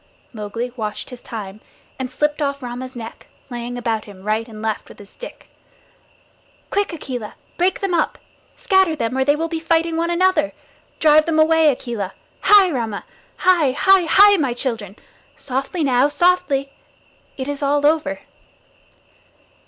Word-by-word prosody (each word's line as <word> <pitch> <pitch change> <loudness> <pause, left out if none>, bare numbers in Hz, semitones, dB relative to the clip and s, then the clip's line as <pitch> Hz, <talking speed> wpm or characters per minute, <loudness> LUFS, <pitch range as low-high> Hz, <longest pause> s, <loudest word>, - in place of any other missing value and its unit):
Mowgli 230 +3 -5
watched 215 +1 -4
his 250 -1 -10
time, 210 -2 -8 0.4
and 260 -1 -3
slipped 295 +3 -1
off 280 -1 -2
Rama's 250 +2 -6
neck, 230 -1 -9 0.2
laying 240 0 -5
about 225 -2 -2
him 195 -2 -13
right 215 +2 -1
and 220 -2 -11
left 220 -1 -3
with - - -14
his 200 -1 -13
stick. - - -11 1.2
"Quick, 405 0 0
Akela! 255 -9 -6 0.2
Break 360 +2 0
them 390 -2 -1
up. 330 - 0 0.4
Scatter 380 -4 +2
them, 230 -3 -2
or 265 - +2
they 290 +2 +3
will 325 +2 -2
be 330 -1 -3
fighting 330 0 +1
one 335 +1 0
another. 345 -3 +2 0.5
Drive 310 0 +5
them 325 -1 +1
away, 320 0 +5
Akela. 235 -7 -5 0.3
Hai, 400 -3 +6
Rama! 225 -7 -3 0.3
Hai, 340 -8 +3
hai, 385 +4 +4
hai! 405 +4 +7
my 275 -7 0
children. 230 -6 -4 0.4
Softly 275 +5 -3
now, 260 -1 +3
softly! 290 -4 +1 0.6
It 260 -1 -4
is 285 0 -4
all 285 +1 +1
over." 310 +1 +1
280 Hz, 150 wpm, -20 LUFS, 235-325 Hz, 1.2 s, hai